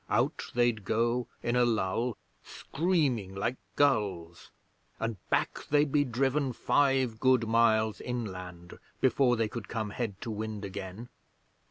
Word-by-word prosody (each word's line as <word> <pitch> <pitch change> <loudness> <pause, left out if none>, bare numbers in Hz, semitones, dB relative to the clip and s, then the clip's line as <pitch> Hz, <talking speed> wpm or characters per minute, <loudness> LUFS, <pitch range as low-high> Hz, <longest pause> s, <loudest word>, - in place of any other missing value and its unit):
Out - - +1
they'd 120 -3 +2
go 115 +3 0 0.2
in 120 +1 0
a 125 - +4
lull, 115 0 0 0.3
screaming 140 - -1
like 120 +6 -1 0.2
gulls, 100 -12 0 0.5
and 115 -2 -2
back - - 0
they'd 145 -1 +3
be 145 0 +4
driven 135 +1 0
five 135 -4 +2
good 130 -3 +3
miles 110 -1 +3
inland 90 -7 -6 0.2
before 130 -1 +3
they 115 -1 +1
could 110 -1 -7
come 110 -3 -3
head 105 -4 -4
to 115 - -4
wind 110 -1 -4
again. 100 +4 -7
115 Hz, 135 wpm, -30 LUFS, 105-130 Hz, 0.5 s, a